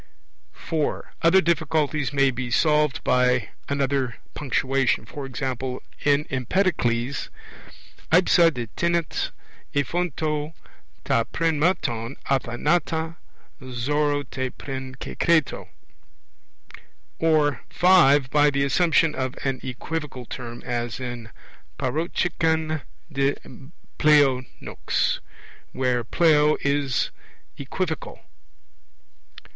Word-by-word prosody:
(4) 155 Hz, -, -3 dB
Other 175 Hz, +3 st, +5 dB
difficulties 155 Hz, -4 st, 0 dB
may 140 Hz, -1 st, +3 dB
be 125 Hz, 0 st, -4 dB
solved 150 Hz, +2 st, +2 dB
by 125 Hz, -3 st, +2 dB, 0.2 s
another 135 Hz, -3 st, 0 dB, 0.2 s
punctuation; 135 Hz, -1 st, 0 dB
e.g. 135 Hz, -1 st, -5 dB, 0.6 s
in 145 Hz, +1 st, +3 dB
Empedocles, 130 Hz, -, 0 dB, 0.8 s
aipsa 170 Hz, 0 st, +5 dB
de 120 Hz, -5 st, -4 dB
thnet 170 Hz, -1 st, 0 dB, 0.5 s
ephyonto, 155 Hz, +1 st, -1 dB, 0.5 s
ta 115 Hz, -, +2 dB
prin 165 Hz, -2 st, 0 dB
mathon 135 Hz, -8 st, 0 dB, 0.2 s
athanata 160 Hz, +6 st, 0 dB, 0.4 s
xora 145 Hz, +3 st, 0 dB
te 130 Hz, -1 st, -3 dB
prin 130 Hz, 0 st, -7 dB
kekreto. 160 Hz, +3 st, 0 dB, 1.5 s
Or 155 Hz, -3 st, +2 dB
(5) 145 Hz, -8 st, +5 dB
by 150 Hz, 0 st, +5 dB
the 140 Hz, -1 st, 0 dB
assumption 165 Hz, +2 st, +3 dB
of 130 Hz, -2 st, -3 dB
an 135 Hz, -2 st, -1 dB
equivocal 130 Hz, 0 st, -5 dB
term, 120 Hz, -1 st, -7 dB
as 120 Hz, -1 st, -3 dB
in 120 Hz, -3 st, -6 dB, 0.5 s
parocheken 160 Hz, -1 st, 0 dB, 0.3 s
de 140 Hz, 0 st, +1 dB, 0.6 s
pleo 145 Hz, -4 st, +5 dB, 0.2 s
nux, -, -, -1 dB, 0.5 s
where 125 Hz, -2 st, 0 dB
pleo 150 Hz, +3 st, +4 dB
in 140 Hz, 0 st, 0 dB, 0.7 s
equivocal. 160 Hz, +4 st, -4 dB
145 Hz, 85 wpm, -24 LUFS, 130-160 Hz, 1.5 s, Other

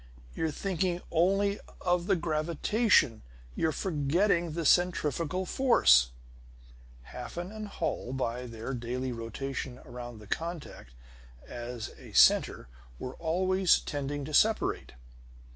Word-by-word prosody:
You're 160 Hz, -, -1 dB
thinking 180 Hz, +2 st, -1 dB
only 195 Hz, +4 st, +2 dB, 0.2 s
of 180 Hz, -1 st, 0 dB
the 195 Hz, -, +4 dB
gravitation; 165 Hz, -, +2 dB, 0.3 s
you're 160 Hz, -, 0 dB
forgetting 170 Hz, +2 st, +1 dB
the 165 Hz, 0 st, -3 dB
centrifugal 170 Hz, +1 st, +2 dB
force." 65 Hz, -, +5 dB, 1.0 s
Hafen 175 Hz, +3 st, -6 dB
and 215 Hz, -1 st, -6 dB
Holl, 160 Hz, -9 st, -3 dB
by 125 Hz, -1 st, -3 dB
their 115 Hz, +3 st, -6 dB
daily 125 Hz, +1 st, -3 dB
rotation 125 Hz, +3 st, -5 dB
around 120 Hz, -1 st, -8 dB
the 105 Hz, -, -12 dB
contact 160 Hz, -, -5 dB, 0.5 s
as 120 Hz, -1 st, -6 dB
a -, -, -13 dB
center -, -, +5 dB, 0.3 s
were 125 Hz, -, -6 dB
always 185 Hz, +3 st, +2 dB
tending 145 Hz, 0 st, -4 dB
to 155 Hz, -, -7 dB
separate. 220 Hz, +7 st, +2 dB
160 Hz, 110 wpm, -30 LUFS, 125-180 Hz, 1.0 s, force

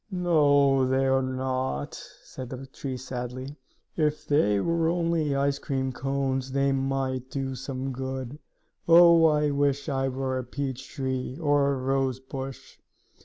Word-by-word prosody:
"No, 145 Hz, -7 st, +3 dB
they 130 Hz, +1 st, +2 dB
are 135 Hz, 0 st, +3 dB
not!" 130 Hz, -, -2 dB, 0.3 s
said 130 Hz, -2 st, -8 dB
the 130 Hz, +1 st, -7 dB
tree 135 Hz, 0 st, -6 dB
sadly. 130 Hz, +2 st, -6 dB, 0.4 s
"If 150 Hz, -1 st, 0 dB
they 105 Hz, -9 st, +3 dB
were 165 Hz, +7 st, +1 dB
only 165 Hz, -4 st, 0 dB
ice 140 Hz, 0 st, +1 dB
cream 130 Hz, -1 st, -2 dB
cones 135 Hz, 0 st, -2 dB
they 140 Hz, 0 st, +2 dB
might 135 Hz, -1 st, -1 dB
be 135 Hz, -1 st, -3 dB
some 135 Hz, +1 st, -4 dB
good. 130 Hz, +1 st, -5 dB, 0.5 s
Oh, 170 Hz, 0 st, +7 dB
I 150 Hz, -1 st, +2 dB
wish 140 Hz, +1 st, 0 dB
I 135 Hz, -1 st, 0 dB
were 130 Hz, 0 st, -2 dB
a -, -, -4 dB
peach 130 Hz, 0 st, -5 dB
tree, 130 Hz, -2 st, -3 dB
or 145 Hz, -3 st, +2 dB
a -, -, -2 dB
rose 130 Hz, 0 st, 0 dB
bush!" 135 Hz, 0 st, -8 dB
135 Hz, 145 wpm, -27 LUFS, 130-145 Hz, 0.5 s, Oh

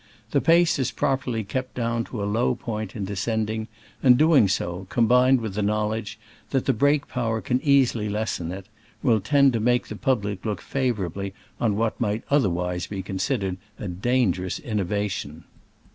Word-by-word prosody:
The 140 Hz, -, +2 dB
pace 170 Hz, -2 st, +4 dB
is 130 Hz, -, +1 dB
prop 135 Hz, 0 st, -1 dB
erly 115 Hz, -5 st, -2 dB
kept 130 Hz, +4 st, -4 dB
down 115 Hz, -1 st, -1 dB
to 110 Hz, -5 st, -5 dB
a -, -, 0 dB
low 115 Hz, +4 st, +1 dB
point 110 Hz, -4 st, -5 dB
in 105 Hz, -4 st, -3 dB
descend 105 Hz, +2 st, -1 dB
ing, 110 Hz, 0 st, -4 dB, 0.3 s
and 125 Hz, -2 st, +6 dB
doing 155 Hz, -7 st, +5 dB
so, 90 Hz, -1 st, -2 dB
combined 125 Hz, +2 st, +4 dB
with 110 Hz, -4 st, -4 dB
the 105 Hz, -, -1 dB
knowledge 105 Hz, +2 st, -1 dB, 0.3 s
that 135 Hz, -2 st, 0 dB
the 135 Hz, -, +3 dB
brake 145 Hz, +4 st, +2 dB
power 115 Hz, -2 st, -1 dB
can 125 Hz, +3 st, -1 dB
easily 130 Hz, -7 st, +3 dB
lessen 105 Hz, -5 st, -2 dB
it, 95 Hz, +1 st, -7 dB, 0.4 s
will 115 Hz, -3 st, +4 dB
tend 140 Hz, +4 st, +4 dB
to 115 Hz, -, 0 dB
make 120 Hz, +2 st, +1 dB
the 110 Hz, -, -5 dB
public 105 Hz, -6 st, -1 dB
look 105 Hz, -5 st, -2 dB
favorably 100 Hz, -7 st, -2 dB, 0.2 s
on 110 Hz, -4 st, +1 dB
what 110 Hz, +2 st, -1 dB
might 105 Hz, -1 st, 0 dB
otherwise 90 Hz, -9 st, +1 dB
be 95 Hz, -2 st, -5 dB
considered 95 Hz, -1 st, -2 dB, 0.2 s
a 105 Hz, -, -5 dB
dangerous 95 Hz, -1 st, 0 dB
innovation. 100 Hz, -7 st, -3 dB
110 Hz, 175 wpm, -24 LUFS, 100-125 Hz, 0.4 s, and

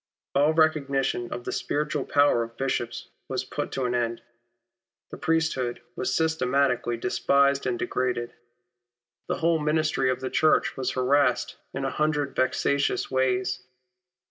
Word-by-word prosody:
All 145 Hz, +3 st, +4 dB
recognition 140 Hz, -6 st, +1 dB
of 120 Hz, -, -5 dB
the -, -, -4 dB
spiritual 150 Hz, -1 st, -2 dB
power 145 Hz, -4 st, +3 dB
of 115 Hz, 0 st, -6 dB
Bishops 125 Hz, -3 st, -2 dB, 0.2 s
was -, -, -2 dB
put -, -, -5 dB
an 125 Hz, -2 st, 0 dB
end 115 Hz, -1 st, 0 dB
to. -, -, -24 dB, 0.9 s
The -, -, -7 dB
priesthood 160 Hz, -6 st, 0 dB, 0.2 s
was -, -, -2 dB
systematically 140 Hz, -6 st, +1 dB
despised 140 Hz, +3 st, +2 dB
and 125 Hz, -1 st, 0 dB
degraded. 120 Hz, -2 st, -2 dB, 0.9 s
The -, -, -1 dB
whole 165 Hz, 0 st, +2 dB
ministry 150 Hz, -3 st, +1 dB
of 130 Hz, -, 0 dB
the 130 Hz, 0 st, -4 dB
Church 155 Hz, -, +3 dB
was 130 Hz, -, -2 dB
harassed 130 Hz, 0 st, +2 dB
in 135 Hz, -, -3 dB
a 135 Hz, -, -1 dB
hundred 150 Hz, -2 st, 0 dB
vexatious 140 Hz, +2 st, +1 dB
ways. 130 Hz, 0 st, 0 dB
135 Hz, 140 wpm, -26 LUFS, 125-150 Hz, 0.9 s, All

